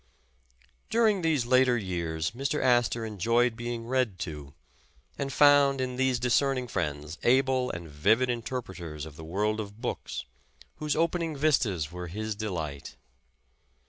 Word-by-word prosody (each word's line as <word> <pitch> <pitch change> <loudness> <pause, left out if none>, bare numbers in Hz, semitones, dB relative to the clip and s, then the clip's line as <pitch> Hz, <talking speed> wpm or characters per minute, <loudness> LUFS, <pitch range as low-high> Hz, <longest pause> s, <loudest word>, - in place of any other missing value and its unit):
During 220 -4 +3
these 155 -7 +1
later 130 0 +4
years 85 -6 -2
Mr. 135 +5 -2
Astor 120 -2 +2
enjoyed 115 +3 +1
being 120 0 -4
read 125 -5 0
to, 75 -4 -6 0.6
and 135 0 -3
found 140 -1 +5
in 130 -1 -2
these 130 -1 +2
discerning 125 +1 +1
friends 75 -5 -3
able 130 0 +3
and 85 -1 -6
vivid 105 - +2
interpreters 95 - -4
of 80 -2 -11
the 80 - -10
world 105 +6 -1
of 105 0 -7
books, 120 - -4 0.5
whose 150 -1 -1
opening 165 -1 0
vistas 115 - +1
were 90 0 -6
his 110 +5 -4
delight. 85 -9 -5
120 Hz, 135 wpm, -28 LUFS, 90-130 Hz, 0.6 s, found